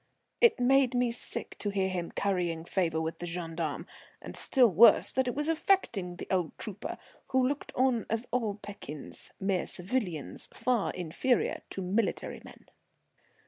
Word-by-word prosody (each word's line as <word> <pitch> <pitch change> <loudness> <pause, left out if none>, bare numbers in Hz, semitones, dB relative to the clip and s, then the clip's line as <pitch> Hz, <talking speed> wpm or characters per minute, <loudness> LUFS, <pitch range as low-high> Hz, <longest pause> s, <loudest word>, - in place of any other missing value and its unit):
It 470 - +6
made 260 0 +4
me 245 -1 +2
sick 235 - -4
to 205 - -2
hear 195 -1 0
him 180 -2 -3
currying 175 -5 -1
favour 170 -4 0
with 160 0 -3
the 175 - -4
gendarme, 165 -3 -3 0.3
and - - -9
still 255 -3 +4
worse 210 +6 +7
that 260 0 +1
it 245 - -1
was 295 +2 +1
affecting 310 - +1
the - - -7
old 180 -4 0
trooper, 210 -1 -5 0.3
who 260 -1 +2
looked 285 +2 -3
on 255 -3 +2 0.2
all 225 -5 0
as - - -21
pekins, 200 -8 -8
mere 190 -2 0
civilians, 180 - -3
far 245 -5 +1
inferior 180 +9 0
to 190 - -4
military 200 +4 -1
men. - - -14
200 Hz, 155 wpm, -30 LUFS, 175-250 Hz, 0.3 s, worse